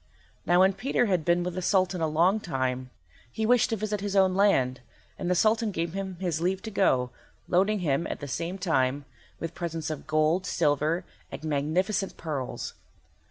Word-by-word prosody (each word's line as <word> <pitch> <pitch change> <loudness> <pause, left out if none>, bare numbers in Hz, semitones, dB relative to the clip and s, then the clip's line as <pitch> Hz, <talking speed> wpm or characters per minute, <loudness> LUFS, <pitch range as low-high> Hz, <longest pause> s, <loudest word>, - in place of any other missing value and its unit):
Now 175 +2 +5
when 190 +1 +5
Peter 245 +5 0
had 185 -6 +1
been 175 +2 +2
with 180 0 -3
the 185 - -3
Sultan 185 -1 +1
a 160 - +2
long 170 +7 +3
time, 130 -7 -2 0.4
he 220 - -2
wished 245 +1 +4
to 225 - 0
visit 210 -1 -3
his 200 0 -3
own 190 -1 +4
land, 135 -11 +2 0.4
and 175 - -2
the 180 - +3
Sultan 220 +4 +3
gave 170 -3 -3
him 195 -1 -4
his 170 -4 -1
leave 185 +2 0
to 220 - -5
go, 130 - +2 0.4
loading 195 +3 +2
him, 155 0 0
at - - -5
the 145 - -6
same 170 +7 -3
time, 140 -6 0 0.3
with 165 0 -4
presents 165 -2 -4
of 155 - -7
gold, 155 +4 +2
silver, 155 +3 +1 0.3
and 135 +2 -7
magnificent 170 +7 -1
pearls. 130 -6 -4
175 Hz, 185 wpm, -27 LUFS, 155-195 Hz, 0.4 s, Now